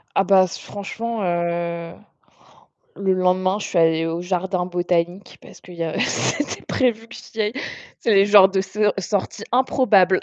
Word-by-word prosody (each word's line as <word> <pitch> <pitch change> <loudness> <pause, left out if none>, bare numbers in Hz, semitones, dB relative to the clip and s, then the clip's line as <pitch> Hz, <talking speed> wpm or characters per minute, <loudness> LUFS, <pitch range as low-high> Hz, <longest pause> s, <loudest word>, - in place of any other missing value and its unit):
Ah 195 - +4
bah 190 0 +5
s 180 - -7
franchement, 220 +2 -5
heu, 170 -1 -2 1.0
le 190 -1 +1
lendemain, 185 +2 +1
je - - -5
suis 175 - -2
allée 165 0 +3
au 165 +1 -3
jardin 180 0 -2
botanique 175 +1 -2
parce - - -15
qu'il 180 - -13
y 170 - -3
a 160 - -3
c'était 290 -1 -1
prévu 230 -3 0
que - - -12
j'y 220 - -6
aille. 210 +2 -1 0.5
C'est 225 - +1
les 195 0 +5
genres 200 -2 +7
de 190 0 0
se 210 +1 0
sorties 200 +3 -3
improbables. 235 -7 +3
190 Hz, 170 wpm, -21 LUFS, 175-210 Hz, 1.0 s, genres